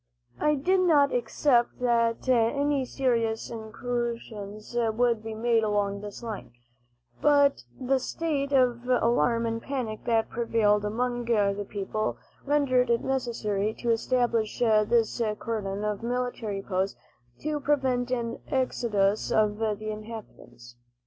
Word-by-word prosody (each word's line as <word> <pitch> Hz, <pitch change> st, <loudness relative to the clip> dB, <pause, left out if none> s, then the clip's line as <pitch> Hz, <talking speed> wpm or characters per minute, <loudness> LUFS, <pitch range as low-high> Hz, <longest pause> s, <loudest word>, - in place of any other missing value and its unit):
I 300 Hz, 0 st, +3 dB
did 370 Hz, +7 st, +2 dB
not 300 Hz, -6 st, +4 dB
expect 240 Hz, +1 st, +1 dB
that 235 Hz, -1 st, +1 dB
any 265 Hz, +3 st, +2 dB
serious 230 Hz, -4 st, -1 dB
incursions 230 Hz, -2 st, -5 dB
would 235 Hz, 0 st, +1 dB
be 220 Hz, 0 st, -6 dB
made 230 Hz, 0 st, +2 dB
along 205 Hz, -1 st, 0 dB
this 205 Hz, +3 st, -8 dB
line, 215 Hz, -, -6 dB, 0.7 s
but 285 Hz, -1 st, +4 dB, 0.2 s
the 260 Hz, +1 st, +1 dB
state 280 Hz, 0 st, -2 dB
of 250 Hz, -3 st, +2 dB
alarm 235 Hz, -1 st, +2 dB
and 230 Hz, 0 st, -2 dB
panic 245 Hz, -6 st, -4 dB
that 225 Hz, -1 st, +1 dB
prevailed 215 Hz, -3 st, +2 dB
among 240 Hz, +3 st, -1 dB
the 205 Hz, -3 st, +1 dB
people 210 Hz, +1 st, -2 dB, 0.3 s
rendered 260 Hz, -4 st, +2 dB
it 235 Hz, 0 st, +2 dB
necessary 220 Hz, -5 st, -1 dB
to 235 Hz, -, -1 dB
establish 230 Hz, -2 st, +1 dB
this 225 Hz, +1 st, +2 dB, 0.2 s
cordon 205 Hz, -3 st, -3 dB
of 210 Hz, -1 st, -2 dB
military 235 Hz, -4 st, -3 dB
posts 190 Hz, 0 st, -2 dB, 0.4 s
to 300 Hz, 0 st, -2 dB
prevent 265 Hz, -4 st, +1 dB
an 235 Hz, -2 st, -2 dB
exodus 215 Hz, -6 st, +1 dB
of 210 Hz, -1 st, +2 dB
the 215 Hz, -1 st, -2 dB
inhabitants. 210 Hz, -, -10 dB
230 Hz, 120 wpm, -27 LUFS, 215-250 Hz, 0.7 s, not